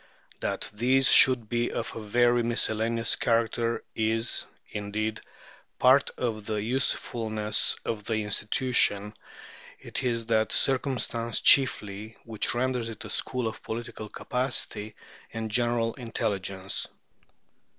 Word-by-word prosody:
That - - -3
these 130 +5 +3
should 125 -4 +6
be 120 +1 -1
of - - -4
a 115 - -5
very 120 +3 +3
miscellaneous 115 0 0
character 115 0 0
is, 115 +1 0 0.3
indeed, 105 +2 -3 0.6
part 130 +2 +5
of 110 -4 -3
the 110 - -1
usefulness 110 -3 +1
of 105 -3 -3
the 110 - -1
institution; 105 -1 +1 0.7
it - - -5
is 115 -2 -1
that 110 -1 +1
circumstance 125 -4 +1
chiefly 110 -5 +3
which 110 0 -2
renders 125 -1 -1
it 110 - -9
a - - -7
school 125 -3 -2
of 110 - -6
political 115 -2 -6
capacity 125 -5 -2 0.4
and 110 -1 -4
general 120 0 +1
intelligence. 100 -6 -3
115 Hz, 115 wpm, -27 LUFS, 110-120 Hz, 0.7 s, should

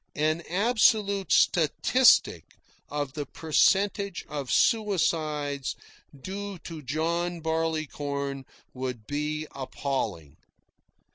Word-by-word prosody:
An 155 +2 +1
absolute 200 0 +2
statistic 225 - +3 0.3
of 145 -2 -3
the 145 -2 -5
percentage 195 +5 +1
of 140 -4 -5
suicides 155 - +1 0.4
due 200 +4 -6
to 165 -2 -7
John 170 +5 -1
Barleycorn 150 -4 -2 0.3
would 125 -4 -5
be 150 +3 -2
appalling. 115 - -4
155 Hz, 80 wpm, -27 LUFS, 140-185 Hz, 0.4 s, statistic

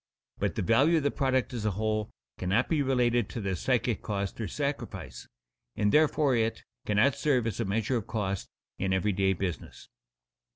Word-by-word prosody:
But - - -1
the - - -1
value 135 - +4
of 155 - 0
the 145 - +2
product 130 -2 0
as 115 -3 -3
a 105 - +2
whole 110 -1 -1 0.3
cannot 95 +2 +1
be 155 -3 +2
related 120 -4 +2
to - - -5
the 100 -3 -1
psychic 120 +3 0
cost 100 +1 -3
or 110 - -2
sacrifice, 145 -1 -4 0.5
and 105 0 +2
therefore 150 -3 +3
it 115 -1 0 0.2
cannot 105 +7 +4
serve 130 -6 +1
as 115 -2 -3
a 115 - 0
measure 110 +5 0
of 110 - -5
cost 100 -4 -3 0.3
in 95 0 0
every 95 +2 +1
day 95 0 +2
business. 90 -3 -5
115 Hz, 180 wpm, -29 LUFS, 100-130 Hz, 0.5 s, value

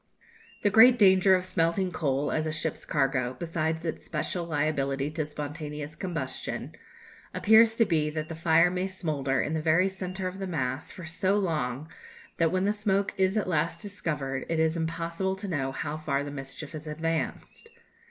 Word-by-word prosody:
The 205 - +3
great 245 +4 +8
danger 190 -2 +6
of 185 0 -1
smelting 180 +1 0
coal, 140 -3 0
as 155 0 0
a - - -1
ship's 155 0 -3
cargo, 135 -3 0
besides 160 +1 -2
its 160 - -3
special 170 +2 -3
liability 145 -3 -1
to 155 -1 -2
spontaneous 150 0 -6
combustion, 165 -9 -4 0.6
appears 220 +1 +6
to 230 - +4
be 155 -5 +1
that 155 0 -4
the 165 - -6
fire 165 +2 +4
may 185 +1 -1
smoulder 145 -8 -1
in 150 - -2
the 160 - 0
very 165 +4 +3
centre 190 -1 -4
of 185 +1 -6
the 195 - -3
mass 135 -5 -2
for 180 - -9
so 185 +5 0
long 155 -7 -1 0.5
that, 165 -1 +2
when 185 +1 +1
the 205 - +3
smoke 200 -1 0
is 190 +2 +2
at 210 - 0
last 165 -2 0
discovered, 150 -10 -3
it 165 -1 0
is 160 0 +2
impossible 165 +3 -2
to 200 +1 -6
know 140 -7 -1
how 145 +3 -4
far 140 -3 -1
the 145 - -6
mischief 135 +1 -7
has 155 -1 -8
advanced. 165 - -3
160 Hz, 180 wpm, -28 LUFS, 150-185 Hz, 0.6 s, great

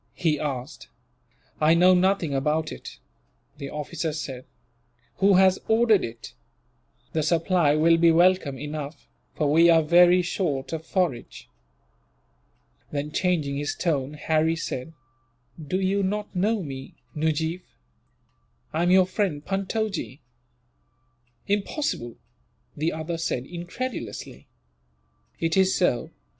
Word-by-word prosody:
he 155 -4 0
asked. 135 0 -5 0.7
"I 155 +1 +4
know 180 +2 +6
nothing 180 -4 +2
about 150 +3 0
it," - - -9 0.6
the 140 -2 -6
officer 150 +2 -4
said. 135 -4 -6 0.7
"Who 195 0 +4
has 190 0 +5
ordered 220 -2 +4
it? 115 0 -8 0.8
The 160 - +1
supply 165 -1 +2
will 165 +2 +4
be 165 0 +5
welcome 175 -4 +3
enough, 150 +2 -7 0.3
for 150 -2 +1
we 165 +3 +6
are 165 -1 +5
very 175 +3 +5
short 160 -6 -2
of 160 -1 -4
forage." 170 -11 -2 1.4
Then, 150 +1 -4
changing 155 -6 0
his 145 0 -2
tone, 145 -5 -1
Harry 160 +2 +1
said: 160 -2 -5 0.7
"You 155 - -8
do 190 +4 0
not 205 +1 -3
know 205 +2 +1
me, 135 -3 -8 0.2
Nujeef. 160 +3 -1 1.1
I 160 - 0
am 175 - +2
your 185 0 +6
friend, 185 -6 -2
Puntojee." 195 - -3 1.3
"Impossible!" 205 - -2 0.6
the 155 +3 -1
other 160 +1 -4
said, 130 -6 -2
incredulously. 175 - -6 0.9
"It 165 -1 0
is 190 0 +3
so. 150 -10 +1
165 Hz, 120 wpm, -25 LUFS, 150-185 Hz, 1.4 s, know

